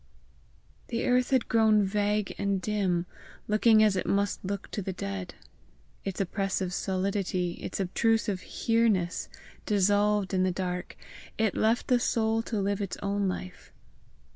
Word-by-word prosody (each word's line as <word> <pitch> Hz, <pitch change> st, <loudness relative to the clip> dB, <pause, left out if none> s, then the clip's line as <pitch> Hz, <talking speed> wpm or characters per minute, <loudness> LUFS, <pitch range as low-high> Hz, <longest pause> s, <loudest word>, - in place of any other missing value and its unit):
The 235 Hz, -1 st, -2 dB
earth 250 Hz, 0 st, +2 dB
had 260 Hz, -3 st, +2 dB
grown 220 Hz, -2 st, +4 dB
vague 205 Hz, +1 st, 0 dB
and 200 Hz, -1 st, 0 dB
dim, 190 Hz, -4 st, 0 dB, 0.4 s
looking 215 Hz, +1 st, +5 dB
as 210 Hz, -2 st, +3 dB
it 185 Hz, -, -2 dB
must 200 Hz, 0 st, 0 dB
look 195 Hz, +1 st, -4 dB
to 205 Hz, -, -3 dB
the 190 Hz, 0 st, -4 dB
dead. 100 Hz, -, -5 dB, 0.7 s
Its 195 Hz, -2 st, -4 dB
oppressive 195 Hz, -1 st, -1 dB
solidity, 190 Hz, -1 st, -1 dB
its -, -, -5 dB
obtrusive 205 Hz, +1 st, +1 dB
HERENESS, 215 Hz, -6 st, 0 dB, 0.4 s
dissolved 205 Hz, 0 st, +2 dB
in 185 Hz, -, +2 dB
the 185 Hz, 0 st, +2 dB
dark, 180 Hz, 0 st, -4 dB, 0.4 s
it 220 Hz, -3 st, +1 dB
left 225 Hz, +2 st, +1 dB
the 250 Hz, -1 st, +4 dB
soul 225 Hz, -1 st, +1 dB
to 225 Hz, -2 st, -3 dB
live 200 Hz, +1 st, -1 dB
its 195 Hz, -, -4 dB
own 200 Hz, 0 st, 0 dB
life. 90 Hz, -, -6 dB
200 Hz, 140 wpm, -28 LUFS, 185-215 Hz, 0.7 s, looking